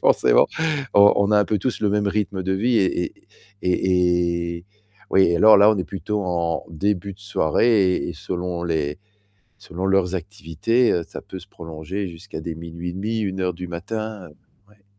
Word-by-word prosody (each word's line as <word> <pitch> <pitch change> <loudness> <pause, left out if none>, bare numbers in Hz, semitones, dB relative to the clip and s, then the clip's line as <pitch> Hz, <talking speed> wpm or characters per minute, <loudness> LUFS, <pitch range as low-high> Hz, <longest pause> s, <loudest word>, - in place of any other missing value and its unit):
forcément. - - +4 0.5
On 100 0 +7
on 100 0 +2
a 105 - +5
un - - +2
peu 110 - +1
tous 125 +5 -2
le 105 - +2
même 105 0 +1
rythme 100 -2 -2
de 95 +1 -1
vie 115 +5 +1
et 90 -2 +1
et - - -7 0.5
et 90 -2 +1
et 85 - -16 0.5
oui, 90 -3 +4
alors 110 +5 +7
là 100 +2 +7
on 110 - +1
est 90 - -1
plutôt 105 +2 -3
en 85 -2 -1
début 100 +3 -2
de - - -27
soirée 100 +1 +2
et - - -2
et - - -8
selon 85 +1 -4
les 80 -3 -2 0.6
selon 90 +3 -7
leurs 95 -1 +2
activités, 100 +6 0
heu, 85 - 0
ça - - -8
peut 95 - -9
se 90 - -15
prolonger 80 +3 -6
jusqu'à 85 0 -9
des 80 +1 -5
00:30, 90 +6 -5
01:00 95 -3 -2
du 90 +1 -7
matin, 105 +3 -5 0.4
ouais. 105 -1 -26
95 Hz, 180 wpm, -22 LUFS, 85-105 Hz, 0.6 s, On